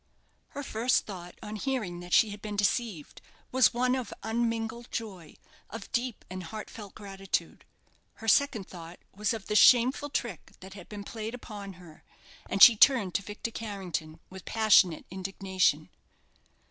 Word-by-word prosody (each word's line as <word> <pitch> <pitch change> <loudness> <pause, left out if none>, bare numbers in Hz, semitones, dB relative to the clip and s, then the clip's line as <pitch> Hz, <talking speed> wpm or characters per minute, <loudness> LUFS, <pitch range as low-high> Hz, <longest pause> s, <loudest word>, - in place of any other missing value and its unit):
Her 285 - -3
first 240 0 +1
thought, 180 -3 -9
on 215 +1 -6
hearing 215 -9 -3
that 175 0 -10
she 215 +2 +5
had 205 0 -9
been 210 -1 -5
deceived, 205 - -1 0.3
was 255 -2 +5
one 250 +1 +1
of 255 -4 -3
unmingled 230 +1 -2
joy, 190 -9 -6 0.3
of - - -9
deep 245 -2 -2
and 185 +1 -6
heartfelt 210 +2 -9
gratitude. 195 -2 -4 0.5
Her 225 - -11
second 225 -3 +3
thought 170 -1 -10 0.2
was 210 +1 0
of 220 -4 -4
the 210 - -2
shameful 255 +6 +5
trick 235 - -4
that 190 +1 -11
had 195 - -12
been 205 -1 -7
played 220 +2 -6
upon 205 -5 -9
her; 175 -3 -16 0.5
and 195 - +5
she 235 - +11
turned 215 -6 +4
to - - 0
Victor 210 +3 -6
Carrington 185 -8 -5
with 190 -1 -11
passionate 205 -7 +4
indignation. 190 -4 0
210 Hz, 155 wpm, -29 LUFS, 185-230 Hz, 0.5 s, she